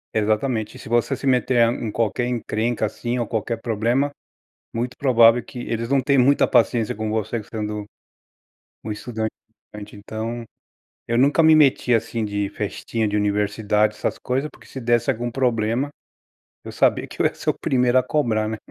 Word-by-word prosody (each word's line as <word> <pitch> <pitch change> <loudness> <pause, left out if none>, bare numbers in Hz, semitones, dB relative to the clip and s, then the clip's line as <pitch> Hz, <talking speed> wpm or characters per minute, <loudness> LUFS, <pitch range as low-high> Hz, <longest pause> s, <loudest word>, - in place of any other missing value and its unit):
É - - +3
exatamente. 110 +1 -1
Se - - -11
você 120 +4 +1
se 135 - -8
meter 125 -2 +3
em 115 -3 -4
qualquer 115 +2 0
encrenca 115 -1 -1
assim, 120 +3 -3
ou 120 - 0
qualquer 115 +1 -2
problema. 120 +5 0 0.6
Muito 120 +2 -3
provável 120 -3 +5
que 125 0 -9
eles 115 -1 -3
não 140 +1 +3
tem 140 +1 +2
muita 135 +3 +4
paciência 115 -4 +2
com 110 0 -3
você 110 +1 -2
sendo 105 -1 -4 1.0
um 110 - -5
estudante. 110 +1 -3 0.6
Então, 110 +3 -5 0.6
eu 120 0 0
nunca 140 +5 +4
me 160 0 +7
meti, 140 -4 +4
assim, 115 0 -1
de 100 -1 -2
festinha 115 +2 -3
de 105 0 -1
universidade, 105 +1 +1
essas - - -2
coisas. 135 +4 -2
Porque - - -18
se 135 - -8
desse 120 -1 +2
algum 120 +2 -2
problema, 120 +1 0 0.7
eu - - -8
sabia - - +2
que - - -6
eu - - +5
ia - - -7
ser - - 0
o - - -15
primeiro 125 -1 +3
a - - -1
cobrar, 115 -6 0
né. 110 0 -3
115 Hz, 175 wpm, -22 LUFS, 110-125 Hz, 1.0 s, me